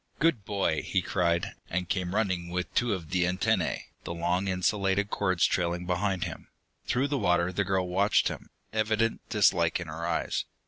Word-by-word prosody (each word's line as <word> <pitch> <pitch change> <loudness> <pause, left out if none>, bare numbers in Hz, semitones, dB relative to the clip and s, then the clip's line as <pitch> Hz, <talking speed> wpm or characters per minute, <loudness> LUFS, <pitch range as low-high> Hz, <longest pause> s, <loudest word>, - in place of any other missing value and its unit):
"Good 155 -10 +2
boy!" 100 -2 0
he 95 - 0
cried, 85 -2 0 0.2
and 90 +1 -1
came 90 0 -1
running 95 -5 0
with 90 +1 -3
two 120 -1 +2
of 85 -5 -6
the 90 -1 +2
antennae, 90 +1 0 0.2
the 85 - -5
long 90 +3 0
insulated 95 +2 +1
cords 95 -4 +2
trailing 85 0 0
behind 95 0 0
him. 85 -2 -6 0.4
Through 135 +3 +1
the 140 -1 0
water 90 -2 +2
the 105 - +1
girl 95 -1 0
watched 100 +4 +3
him, - - -6 0.2
evident 110 +1 +1
dislike 90 -6 +3
in 90 - -5
her 80 +1 -6
eyes. - - -1
90 Hz, 175 wpm, -28 LUFS, 85-100 Hz, 0.4 s, watched